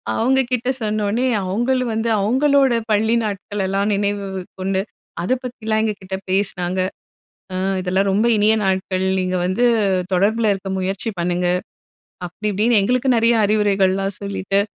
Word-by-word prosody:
அவங்க 265 +4 +3
கிட்ட 250 0 0
சொன்ன 215 -1 -1
உடனே, 235 +5 0 0.2
அவங்களூம் 240 +5 0
வந்து 225 +1 0
அவங்களோட 270 +4 +3 0.2
பள்ளி 220 +2 +2
நாட்களெல்லாம் 200 0 -2
நினைவு 200 -1 -2 0.2
கொண்டு, 190 0 0 0.4
அத 180 - -2
பத்திலாம் 220 -3 -2
எங்க 215 -1 -1
கிட்ட 190 0 -5
பேசினாங்க. 185 -2 -1 0.8
"அ - - -2 0.3
இதெல்லாம் 190 +2 +1
ரொம்ப 210 +4 +2
இனிய 210 +1 +4
நாட்கள். 190 0 0
நீங்க 185 0 -1
வந்து 190 +7 +1 0.5
தொடர்பில 210 +3 +2
இருக்க 195 0 -6
முயற்சி 195 +4 -2
பண்ணுங்க." 175 +1 0 0.8
அப்படி 210 +5 -4
இப்படின்னு 215 +3 +3
எங்களுக்கு 250 +5 +1
நெறைய 230 +1 +3
அறிவுரைகள்லாம் 195 -2 +1
சொல்லிட்டு 200 0 -1
205 Hz, 135 wpm, -20 LUFS, 190-225 Hz, 0.8 s, இனிய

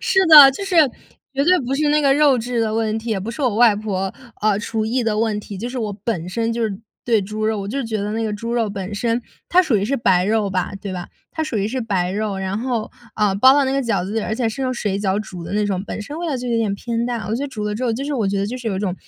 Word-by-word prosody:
是 470 -5 +2
的， 295 -4 +11
就 275 +9 -6
是 385 -2 -1 0.6
绝 275 +1 +1
对 365 +3 +5
不 260 +1 -2
是 295 +2 +1
那 300 +1 +3
个 280 -2 +4
肉 285 -3 +4
质 240 +1 -2
的 220 -1 0
问 220 -1 0
题， 225 +1 -6
也 205 -3 0
不 210 +5 -4
是 235 +5 -6
我 245 -5 +1
外 235 -3 +6
婆， 195 -2 -3 0.3
呃， 210 -1 +2
厨 220 0 -2
艺 240 +3 0
的 220 -2 0
问 220 -1 0
题， 205 -1 -8
就 235 +5 -4
是 255 +1 -5
我 215 -3 -2
本 180 -7 -2
身 230 +5 -1
就 235 0 -2
是 205 -4 -2 0.3
对 230 -3 +3
猪 215 +2 -3
肉 220 -1 0
我 195 - -5
就 275 +6 -2
觉 225 -1 -2
得 205 +1 -3
那 225 +1 -1
个 215 - -2
猪 230 +3 -4
肉 235 -2 +1
本 200 0 -5
身 230 +3 -1 0.3
它 365 +1 +5
属 280 -10 +1
于 200 - 0
是 275 +6 0
白 180 -6 +3
肉 210 0 +1
吧。 185 -1 -1
对 195 -1 -5
吧？ 180 -1 -6 0.2
它 315 - -2
属 265 -8 -3
于 200 +1 0
是 260 +3 -3
白 190 -5 -1
肉， 205 0 -2
然 190 +1 -2
后， 235 -2 -2 0.2
呃， 210 -2 +1
包 260 +6 +7
到 285 0 +3
那 265 - 0
个 275 0 +1
饺 215 -7 0
子 195 - -5
里， 225 - 0
而 215 - -2
且 230 0 0
是 245 +5 -4
用 255 -1 0
水 205 -5 -2
饺 200 0 0
煮 180 -5 -8
的 - - -7
那 210 +1 +1
种， 190 -2 -1
本 - - -5
身 285 +9 -7
味 345 - -3
道 305 - -1
就 250 0 -5
有 235 - +1
点 215 -3 0
偏 230 +3 -3
淡， 240 -1 -2
我 215 - 0
觉 250 - -2
得 - - -4
煮 230 -6 -6
了 210 0 -2
之 240 +5 -3
后， 235 - +1
就 240 +5 -3
是 290 0 -2
我 225 -6 0
觉 195 +1 0
得 200 - 0
就 245 +5 -4
是 240 -2 -4
有 195 - -2
一 - - -2
种 190 -3 -2
225 Hz, 340 characters per minute, -20 LUFS, 205-250 Hz, 0.6 s, 的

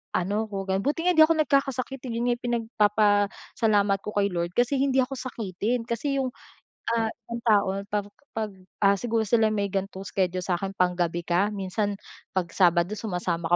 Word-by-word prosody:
ano 205 +5 0
ko 195 -1 -3
gan 190 0 +1
buti 300 +4 0
nga 360 - +6
hindi 315 0 +9
ako 330 - +3
nagkakasakit, 270 -1 0
'yon 235 0 -1
nga 240 - 0
pinagpapasalamat 210 -2 +2
ko 210 - -4
kay 200 - +3
Lord 170 0 -2
kasi 245 +3 +3
hindi 265 -1 +2
ako 270 +2 -5
sakitin 230 -1 -2
kasi 275 +5 -1
'yong, 260 -1 0 0.7
ah, 225 -1 +1
isang 235 0 -8
tao 210 -4 +4 0.2
'pag 205 -1 -1 0.3
'pag, 215 -2 -2 0.3
ah, 200 0 +6
siguro 230 -2 0
sila 220 0 +4
may 205 -1 0
gan'tong 195 0 -3
schedule 185 -1 0
sa 180 - +1
akin 195 +1 -3
panggabi 175 -2 +1
ka 180 +4 +2
minsan 200 +1 -2 0.4
'pag 185 -2 0
sabado 175 +1 +3
sumasama 175 -5 -2
205 Hz, 175 wpm, -26 LUFS, 190-235 Hz, 0.7 s, hindi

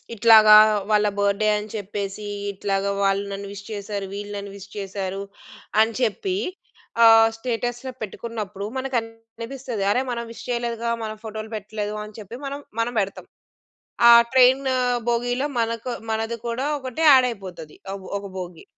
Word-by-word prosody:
ఇట్లాగా 215 -1 +8 0.3
వాళ్ళ 210 0 +4
బర్డే 200 +1 +1
అని 210 +1 -6
చెప్పేసి, 205 0 -5 0.2
ఇట్లాగా 195 0 -1
వాళ్ళు 195 +1 +2
నన్ను 200 0 -5
విష్ 200 0 -9
చేశారు, 205 -1 -4
వీళ్ళు 205 +1 -6
నన్ను 200 0 -6
విష్ 200 0 -11
చేశారు, 195 -1 -4 0.6
అని 225 +1 +4
చెప్పి 315 - 0 0.7
ఆహ్, 225 0 +7
స్టేటస్‌లో 240 +2 -3
పెట్టుకున్నప్పుడు 210 -2 -5
మనకనిపిస్తది. 230 -1 -4
అరే! 250 - +1
మనం 235 -1 -3
విష్ 230 - -10
చేయలేదుగా 235 -1 -2
మనం 215 0 -5
ఫోటోలు 220 0 -6
పెట్టలేదు 210 0 -5
అని 210 +1 -12
చెప్పి 215 +3 -9
మనం 280 +1 -5 0.2
మనం 240 +1 0
బెడతాం. 195 0 -4 0.8
ఆ - - +10 0.2
ట్రైన్ 260 +1 +5 0.5
భోగీలో 245 +3 0
మనకు 230 +2 -2 0.2
మనది 225 +1 -2
కూడా 255 +4 -2
ఒకటే 260 +4 -4
యాడ్ 260 -2 +7
అయిపోతది 180 -7 -10 0.2
ఒక 195 - -8 0.2
ఒక 200 - -8
భోగి. 175 -2 -8
220 Hz, 140 wpm, -23 LUFS, 200-235 Hz, 0.8 s, ఆ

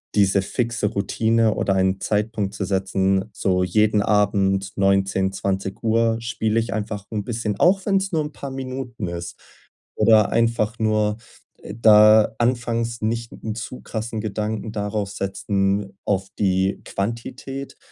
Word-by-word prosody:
diese 100 -1 +4
fixe 115 +2 -1
Routine 110 +2 +1
oder 95 - 0
einen 95 0 +1
Zeitpunkt 105 -1 -1
zu 100 - -2
setzen, 95 0 +1
so 90 -2 +1
jeden 105 +3 +2
Abend 100 -1 +1
19, 95 -1 +2
20:00 110 +4 0
spiele 115 -1 0
ich 110 -4 -2
einfach 105 -1 -4
'n 105 -2 -2
bisschen, 110 -3 -3
auch 190 +2 +3
wenn's 195 -1 +1
nur 160 -3 +1
'n 150 0 -7
paar 140 -1 -7
Minuten 130 -5 -5
ist, 85 0 -6 0.6
oder 110 -3 +5
einfach 115 -1 +1
nur 105 -1 +1 0.6
da 110 -1 +6
anfangs 115 -1 0
nicht 115 +1 -2
'n 110 -1 -6
zu 120 +3 -6
krassen 110 0 -4
Gedanken 110 +1 -3
darauf 105 -1 -2
setzen 100 0 -1
auf 95 -1 0
die 95 -1 +1
Quantität, 125 +6 -5
105 Hz, 135 wpm, -22 LUFS, 100-115 Hz, 0.6 s, da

